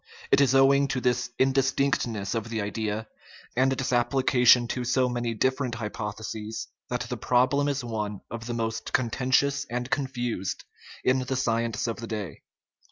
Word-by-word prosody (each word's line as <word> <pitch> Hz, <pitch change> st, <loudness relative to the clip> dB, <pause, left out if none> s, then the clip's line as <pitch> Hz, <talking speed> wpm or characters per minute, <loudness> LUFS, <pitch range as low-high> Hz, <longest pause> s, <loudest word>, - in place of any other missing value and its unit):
It 140 Hz, -, +6 dB
is 135 Hz, -1 st, +4 dB
owing 140 Hz, +1 st, +5 dB
to 135 Hz, -1 st, -1 dB
this 125 Hz, -1 st, 0 dB
indis 135 Hz, 0 st, +3 dB
tinctness 120 Hz, -8 st, 0 dB
of 115 Hz, -1 st, -3 dB
the 115 Hz, -1 st, -2 dB
idea, 105 Hz, +1 st, -2 dB, 0.5 s
and 130 Hz, +2 st, +3 dB
its 130 Hz, -1 st, -1 dB
application 125 Hz, -1 st, +4 dB
to 125 Hz, -, -2 dB
so 125 Hz, +1 st, +2 dB
many 120 Hz, -2 st, -2 dB
different 130 Hz, +1 st, 0 dB
hypotheses, 110 Hz, 0 st, -5 dB, 0.2 s
that -, -, -2 dB
the -, -, -4 dB
problem 130 Hz, +3 st, +2 dB
is 140 Hz, -2 st, -1 dB
one 105 Hz, -4 st, -4 dB
of 115 Hz, 0 st, -6 dB
the 120 Hz, -, -3 dB
most 115 Hz, -1 st, -3 dB
contentious 130 Hz, +3 st, +2 dB
and 125 Hz, +2 st, -3 dB
confused 120 Hz, -8 st, -2 dB, 0.4 s
of 130 Hz, 0 st, +2 dB
the 130 Hz, -, -1 dB
science 115 Hz, -3 st, 0 dB
of 115 Hz, -1 st, -2 dB
the 115 Hz, 0 st, -6 dB
day. 105 Hz, -8 st, -5 dB
120 Hz, 165 wpm, -27 LUFS, 115-130 Hz, 0.5 s, It